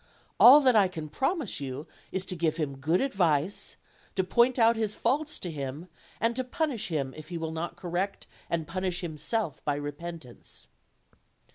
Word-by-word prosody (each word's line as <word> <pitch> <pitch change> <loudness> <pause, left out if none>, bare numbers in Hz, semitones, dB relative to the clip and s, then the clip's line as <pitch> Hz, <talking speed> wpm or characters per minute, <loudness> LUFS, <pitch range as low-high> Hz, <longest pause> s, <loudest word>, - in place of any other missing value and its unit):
All 275 +5 +10
that 255 -4 +4
I 200 -3 +6
can 160 -4 -7
promise 270 - -1
you 135 +1 -5 0.3
is 190 0 -2
to 185 - 0
give 160 -2 0
him 140 -4 -3
good 160 +6 +2
advice, 180 - 0 0.4
to 190 - +2
point 240 +7 +3
out 230 -1 +5
his 215 -2 -1
faults 300 +6 0
to 175 - -4
him, 145 +3 -6 0.3
and 230 +1 +1
to 255 - -1
punish 255 -5 -1
him 140 -6 -2
if 155 0 -10
he 175 - -4
will 160 -1 -3
not 160 +2 -4
correct 185 +2 -3 0.2
and 165 -2 -1
punish 185 +1 -2
himself 165 +3 -3
by 145 - 0
repentance." 145 -2 -8
175 Hz, 170 wpm, -28 LUFS, 155-225 Hz, 0.4 s, All